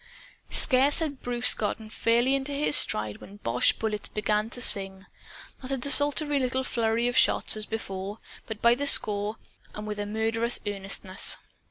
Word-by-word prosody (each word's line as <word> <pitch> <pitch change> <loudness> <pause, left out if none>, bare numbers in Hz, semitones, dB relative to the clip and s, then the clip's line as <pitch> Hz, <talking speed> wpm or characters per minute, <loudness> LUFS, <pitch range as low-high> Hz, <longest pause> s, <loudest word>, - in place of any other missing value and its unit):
Scarce 275 +1 +3
had 295 -5 -2
Bruce 245 0 +1
gotten 215 +1 -5
fairly 235 +4 +1
into 275 +1 -2
his 290 +1 0
stride 105 0 0
when 195 - -14
the - - -14
boche 115 +1 +1
bullets 215 -2 -4
began 210 +1 -2
to 245 - -5
sing 195 -4 +3 0.6
not 255 - -8
a 270 - -1
desultory 290 +2 +2
little 260 0 -2
flurry 230 -1 -1
of 245 - -3
shots, - - +3
as 215 0 -2
before; 200 -2 -6 0.3
but 220 -1 -8
by 235 0 +5
the 285 +4 -2
score, 210 -4 +2 0.4
and 210 - -7
with 210 -1 -6
a 205 - -4
murderous 225 +2 -1
earnestness. 195 -1 +2
225 Hz, 170 wpm, -26 LUFS, 205-260 Hz, 0.6 s, by